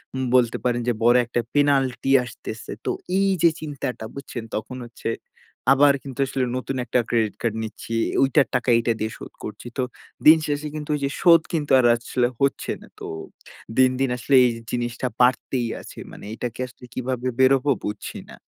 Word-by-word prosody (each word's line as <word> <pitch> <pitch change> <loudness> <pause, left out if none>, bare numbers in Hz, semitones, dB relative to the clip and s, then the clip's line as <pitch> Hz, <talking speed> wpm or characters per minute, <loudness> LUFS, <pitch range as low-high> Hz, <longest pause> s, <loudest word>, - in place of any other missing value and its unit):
উম 130 - -1
বলতে 120 -2 +3
পারেন 120 -1 +1
যে 120 - +3
বড় 120 +1 +6
একটা 120 +1 -1
penalty 135 -3 +2
আসতেছে। 120 - -8
তো - - +1 0.3
এই 195 0 +3
যে 170 - +8
চিন্তাটা 140 -6 -4
বুঝছেন? 130 -4 -6
তখন 110 +4 -4
হচ্ছে 115 -1 -6 0.6
আবার 140 +1 +5
কিন্তু 135 -1 -9
আসলে 130 -1 -1
নতুন 135 +1 -4
একটা 125 +2 +1
credit 110 -4 +1
card 115 -2 0
নিচ্ছি, 115 +1 -6 0.3
ওইটার 135 +1 +3
টাকা 125 0 0
এইটা 115 0 +1
দিয়ে 110 +1 -2
শোধ - - -9
করছি। 105 +3 -7
তো 130 - +1 0.4
দিন 160 +1 +10
শেষে 145 +1 -2
কিন্তু 150 -1 -6
ওই - - -3
যে 140 - 0
শোধ 170 -3 +7
কিন্তু 150 -3 -1
আর 120 - +3
আসলে 120 +1 0
হচ্ছে 140 0 +1
না। - - -14
তো - - -7 0.7
দিন, 130 -1 +6
দিন 135 -2 +2
আসলে 135 +3 +1
এই 120 - +3 0.2
জিনিসটা 120 +1 -2
বাড়তেই 125 -1 +2
আছে। - - -11
মানে - - -11
এটা 120 - -3
থেকে - - -16
আসলে 125 0 -15
কিভাবে 130 0 -2
বের 130 0 +6
হবো 140 +2 0
বুঝছি 105 0 -5
না? - - -12
125 Hz, 190 wpm, -23 LUFS, 120-140 Hz, 0.7 s, দিন